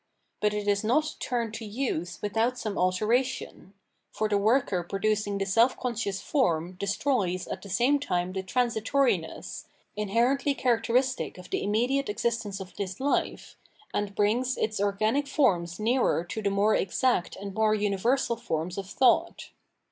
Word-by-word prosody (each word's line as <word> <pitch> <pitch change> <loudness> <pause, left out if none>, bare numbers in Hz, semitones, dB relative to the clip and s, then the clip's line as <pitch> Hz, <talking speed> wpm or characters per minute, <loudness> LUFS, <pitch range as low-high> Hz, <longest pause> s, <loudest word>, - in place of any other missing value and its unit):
But 210 0 +1
it 205 0 -3
is 200 0 +2
not 300 +8 +1
turned 235 -3 -2
to 225 - -6
use 210 -6 -3
without 225 +4 0
some 215 -4 -3
alteration: 210 +2 0 0.4
for 215 - -1
the 205 -1 +2
worker 215 -3 +2
producing 205 +2 -1
the 195 - -1
self 230 +6 +3
conscious 220 -6 -2
form 175 - 0
destroys 200 -2 0
at - - -5
the 200 - -10
same 245 +9 +3
time 180 -8 -1
the 190 - -2
transitoriness, 230 - 0 0.3
inherently 240 +7 +1
characteristic 250 0 +1
of 180 - -12
the - - 0
immediate 245 +6 +1
existence 215 -2 -2
of 190 -1 -9
this 190 -2 -3
hfe, 280 +6 -1 0.4
and 205 -1 -2
brings 240 +5 +1
its 215 -2 -1
organic 215 +8 +1
forms 180 - +1
nearer 230 -5 +2
to 185 +5 -5
the 205 - +1
more 200 +2 +2
exact 195 0 +1
and 200 0 -7
more 215 +1 +2
uni 205 -1 0
versal 235 +2 +1
forms 165 +1 -3
of 195 -1 -7
thought. 260 +3 +2
215 Hz, 155 wpm, -28 LUFS, 195-245 Hz, 0.4 s, self